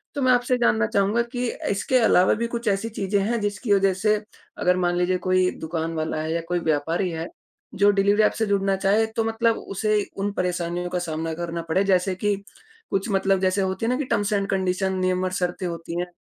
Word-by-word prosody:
तो 285 Hz, -, -2 dB
मैं 255 Hz, -, +4 dB
आपसे 245 Hz, +1 st, +2 dB
जानना 110 Hz, -, +3 dB
चाहूँगा 205 Hz, +4 st, +1 dB
की 245 Hz, 0 st, -1 dB, 0.3 s
इसके 205 Hz, +6 st, +1 dB
अलावा 185 Hz, -5 st, +4 dB
भी 235 Hz, -, +1 dB
कुछ 235 Hz, -1 st, -5 dB
ऐसी 200 Hz, +3 st, -1 dB
चीज़ें 200 Hz, -1 st, -1 dB
हैं 235 Hz, +2 st, 0 dB
जिसकी 205 Hz, +1 st, 0 dB
वजह 195 Hz, -1 st, +3 dB
से 210 Hz, +3 st, +2 dB, 0.4 s
अगर 180 Hz, 0 st, +2 dB
मान 175 Hz, -1 st, +1 dB
लीजिए 180 Hz, +1 st, +1 dB
कोई 185 Hz, 0 st, +3 dB
दुकान 160 Hz, 0 st, -3 dB
वाला 155 Hz, 0 st, -2 dB
है 160 Hz, +1 st, -2 dB
या 170 Hz, -, -1 dB
कोई 175 Hz, 0 st, +1 dB
व्यापारी 165 Hz, +5 st, 0 dB
है 165 Hz, +1 st, -4 dB, 0.5 s
जो 205 Hz, +1 st, +5 dB
डिलिवरी 200 Hz, +2 st, +3 dB
ऐप -, -, +3 dB, 0.2 s
जुड़ना 195 Hz, -1 st, +2 dB
चाहे 200 Hz, +3 st, +2 dB
तो 225 Hz, -, +2 dB
मतलब 225 Hz, 0 st, +1 dB, 0.2 s
उसे 215 Hz, +1 st, +1 dB, 0.2 s
उन 205 Hz, +1 st, -1 dB
परेशानियों 180 Hz, -1 st, -2 dB
का 180 Hz, -, -1 dB
सामना 160 Hz, -1 st, -3 dB
करना 170 Hz, 0 st, -4 dB
पड़े 190 Hz, +4 st, +2 dB
जैसे 185 Hz, 0 st, +2 dB
कि 205 Hz, +2 st, 0 dB, 0.6 s
कुछ 195 Hz, +4 st, -1 dB
मतलब 195 Hz, 0 st, +2 dB
जैसे 185 Hz, +1 st, +1 dB
होती 190 Hz, +3 st, -1 dB
है -, -, +1 dB
ना 255 Hz, -, +1 dB
कि 290 Hz, -, -2 dB
टर्म्स 205 Hz, -3 st, 0 dB
एंड 200 Hz, -1 st, 0 dB
कंडीशन 190 Hz, 0 st, 0 dB
नियम 185 Hz, 0 st, 0 dB
और 185 Hz, -, -2 dB
शर्तें 180 Hz, 0 st, -2 dB
होती 170 Hz, 0 st, -5 dB
हैं 180 Hz, -, -2 dB
190 Hz, 215 wpm, -24 LUFS, 175-205 Hz, 0.6 s, जो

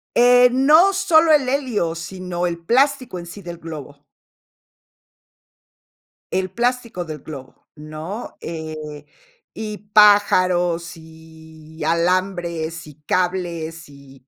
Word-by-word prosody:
Eh, 245 Hz, +1 st, +6 dB
no 305 Hz, +9 st, +5 dB
solo 335 Hz, -4 st, +4 dB
el 285 Hz, -4 st, +4 dB
helio, 255 Hz, -, -1 dB
sino 180 Hz, +1 st, -4 dB
el 170 Hz, -1 st, -3 dB
plástico 255 Hz, +1 st, +1 dB
en 170 Hz, -, -9 dB
sí 175 Hz, +4 st, -10 dB
del 175 Hz, -2 st, -8 dB
globo. 145 Hz, -3 st, -9 dB, 2.3 s
El 185 Hz, 0 st, -1 dB
plástico 240 Hz, -6 st, -2 dB
del 155 Hz, -2 st, -7 dB
globo, 135 Hz, -3 st, -11 dB
¿no? 155 Hz, +8 st, -8 dB
Eh, 155 Hz, -2 st, -7 dB, 0.5 s
y 215 Hz, -1 st, -6 dB, 0.2 s
pájaros, 185 Hz, -5 st, +4 dB
y 160 Hz, -1 st, -13 dB
alambres, 170 Hz, -1 st, -1 dB
y 150 Hz, -2 st, -13 dB
cables, 170 Hz, -2 st, -2 dB
y 135 Hz, -2 st, -17 dB
175 Hz, 105 wpm, -20 LUFS, 160-215 Hz, 2.3 s, Eh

